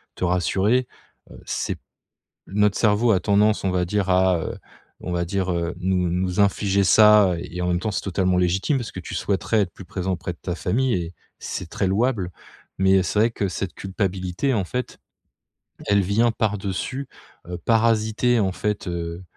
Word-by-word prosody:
te - - -2
rassurer, 95 +8 +1 0.4
heu, - - -12
c'est - - -3 0.7
notre 105 0 +2
cerveau 110 +2 +3
a 95 - +3
tendance, 105 +2 +2
on 95 - +1
va 90 -1 +1
dire 100 +1 -1
à, 90 -1 +3
heu, - - -5 0.4
on 90 - -5
va 85 0 0
dire, 95 +1 -1
heu, 85 0 -2
nous 90 -1 0
nous 90 +2 -1
infliger 100 0 +2
ça 105 -1 +6
et 90 +1 -6
en 90 - -1
même 90 0 +1
temps 105 +4 -2
c'est - - -2
totalement 95 -1 0
légitime, 95 - +1
parce 120 -4 -5
que 95 - -7
tu - - -8
souhaiterais 105 +2 0
être 90 - -2
plus 95 - -11
présent 95 +1 -3
auprès 90 0 -4
de - - -21
ta 90 -1 -3
famille 125 +9 0
et 85 -1 -4 0.3
c'est - - -5
très 100 - -1
louable, 100 -2 0 0.5
mais 95 0 +4
c'est 100 +4 -1
vrai 115 +2 +4
que 100 - -2
cette 90 +1 -4
culpabilité, 95 +4 -2
en 100 - +1
fait, 125 +7 -4 0.9
elle 100 0 +4
vient 105 +5 +2
par-dessus, 110 +5 -2 0.4
heu, 90 - -5
parasiter, 115 +1 +2
en 95 -2 +1
fait, 105 0 -3
heu, 85 +1 -5
95 Hz, 185 wpm, -23 LUFS, 90-105 Hz, 0.9 s, ça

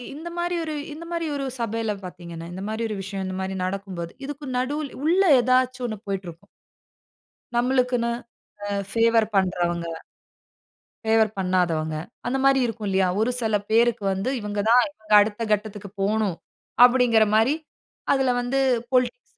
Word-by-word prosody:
இந்த 325 +3 -7
மாரி 350 0 -1
ஒரு 310 -1 -4 0.2
இந்த 335 +3 -9
மாரி 335 -1 -2
ஒரு 275 -1 -2
சபையில 225 -1 -1
பார்த்தீங்கன்னா, 170 -2 -8
இந்த 190 - -6
மாரி 220 +1 -2
ஒரு 210 - -3
விஷயம் 190 0 -5
இந்த 185 - -4
மாரி 190 0 -3
நடக்கும் 195 -1 -4
போது, 170 0 -5
இதுக்கு 290 0 -7
நடுல 285 +3 -2 0.2
உள்ள 360 +4 +4 0.2
ஏதாச்சும் 255 0 +1
ஒண்ணு 215 -3 -5
போயிட்டு 195 -2 -3
இருக்கும். 165 0 -14 1.1
நம்மளுக்குன்னு 245 -1 +1 0.6
அ - - -4 0.2
ஃபேவர் 230 -1 +3
பண்றவங்க. 175 -3 +1 1.2
ஃபேவர் 220 -1 +3
பண்ணாதவங்க. 170 -4 0 0.3
அந்த 270 +2 0
மாரி 275 0 +5
இருக்கும் 220 -3 -4
இல்லையா. 190 -1 +2
ஒரு 225 - +2
செல 220 -2 +1
பேருக்கு 230 -1 +3
வந்து, 195 +7 -1
இவங்க 205 0 -3
தான், 245 +1 +7
இவங்க 215 -6 -9
அடுத்த 210 +2 0
கட்டத்துக்கு 205 -2 -2
போணும். 210 -3 +1 0.5
அப்பிடீங்கிற 245 -3 +5
மாரி, 225 +6 +4 0.6
அதில 270 -2 +2
வந்து 250 +3 -1 0.3
பொலிடிக்ஸ் 255 - +1
220 Hz, 150 wpm, -24 LUFS, 195-255 Hz, 1.2 s, தான்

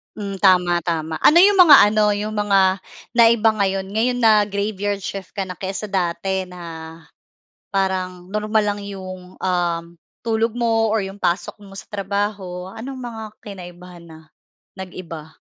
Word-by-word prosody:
Hmm, 200 -2 -5
tama, 180 -2 +4
tama. 160 -2 -2
Ano 335 +3 +7
'yong 400 +2 +6
mga 335 -7 +9
ano 210 0 +2
'yong 210 +1 -3
mga 195 -2 +2 0.3
naiba 230 -1 +5
ngayon, 195 -1 -1
ngayon 245 +2 +1
na 215 -3 +5
graveyard 200 0 -2
shift 195 -1 -6
ka 195 -2 -4
na 180 - -6
kaysa 195 +2 -5
dati 190 0 -1
na 180 -1 -12 1.2
parang 185 -1 -2
normal 215 +1 +1
lang 205 0 -2
'yong, 185 -2 -9
um, 175 -2 -1 0.4
tulog 225 0 0
mo 225 -2 +1
or 215 - +1
'yong 195 +1 -7
pasok 175 +1 -1
mo 195 -1 -14
sa - - -10
trabaho. 195 -2 -3
Anong 260 +5 -8
mga 230 -2 -7 0.2
kinaibahan 180 -3 -11
na? 160 -1 -13 0.6
Nag-iba? 165 -4 -9
195 Hz, 145 wpm, -21 LUFS, 180-215 Hz, 1.2 s, mga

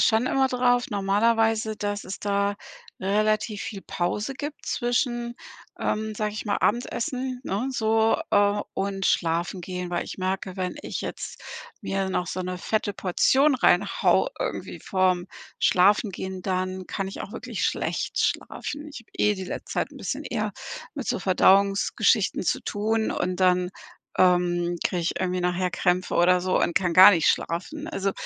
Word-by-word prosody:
schon 225 +2 +3
immer 265 0 +2
drauf 245 -1 +2
normalerweise, 220 +2 +2
dass 205 0 -3
es 190 - -6
da 200 0 0 0.4
relativ 215 +2 0
viel 205 -3 -6
Pause 205 +8 -2
gibt 290 +2 -6
zwischen 240 -1 -1 0.4
ähm, 215 0 -2
sag 210 0 -1
ich 215 - -5
mal, 205 -2 0
Abendessen, 250 +2 -1
ne, 220 +3 -2
so, 225 -2 +2
äh, 205 0 +3
und 195 0 -2
Schlafengehen. 175 +2 -1
Weil 175 - -1
ich - - -8
merke, 185 0 -2
wenn 185 -1 -3
ich - - -4
jetzt - - -6 0.4
mir 195 0 -1
noch 180 -1 -1
so 185 - -3
'ne 180 0 -4
fette 215 +1 -1
Portion 265 +10 +3
reinhau 205 - +3
irgendwie - - -4
vorm 185 -2 +1 0.3
Schlafengehen, 190 0 +2
dann 185 0 -2
kann 195 - -3
ich 195 - -8
auch - - -8
wirklich - - -4
schlecht - - -1
schlafen. 295 +1 -2
Ich 290 - -9
hab 230 - -22
eh 210 0 +3
die 190 -1 -6
letzte 180 - -6
Zeit - - -1
'n - - -12
bisschen - - -3
eher - - -2 0.4
mit - - -5
so - - 0
Verdauungsgeschichten 195 +1 +3
zu - - +1
tun 220 +2 0
und 180 +1 -1
dann, 180 -1 +3 0.5
ähm, 175 -1 +3
krieg 180 - -2
ich 170 - -2
irgendwie 185 -1 -1
nachher 180 0 0
Krämpfe 180 0 0
oder 180 +1 +4
so 185 +1 0
und - - +1
kann 180 -2 +2
gar 190 +3 +11
nicht 170 -6 +2
schlafen. 295 - -2
Also, 195 -11 -1
200 Hz, 160 wpm, -25 LUFS, 185-220 Hz, 0.5 s, gar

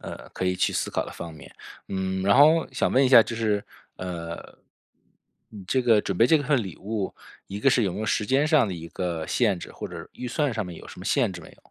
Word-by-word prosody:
呃， - - -9
可 - - -3
以 90 0 +1
去 90 - +1
思 - - -2
考 - - -1
的 - - -8
方 85 -1 -8
面。 75 - -14 0.3
嗯， 95 -1 -2
然 100 +5 +4
后 155 +3 +6
想 - - 0
问 130 - +4
一 130 - +3
下 120 -3 +9
就 120 - -6
是， 105 -3 0 0.3
呃 85 -2 -5 1.2
嗯， 105 -3 -10
这 130 - +1
个 115 -4 +4
准 95 - -3
备 115 - +5
这 160 - +5
份 140 -4 +1
礼 95 -4 -8
物， 105 -1 -4 0.3
一 100 - -6
个 135 +5 +3
是 120 -4 +3
有 95 - -1
没 105 - -5
有 110 - -3
时 105 -1 0
间 135 +6 +2
上 150 -8 +4
的 95 - -4
一 85 0 -8
个 85 -3 -3
限 105 -7 +1
制 - - -9
或 - - -7
者 - - -8
预 125 - -6
算 145 +2 0
上 110 -2 -2
面 90 -2 -8
有 - - -12
什 - - -12
么 90 - -9
限 120 -6 +2
制 90 - -8
没 80 - -13
有？ - - -24
105 Hz, 280 characters per minute, -25 LUFS, 90-125 Hz, 1.2 s, 下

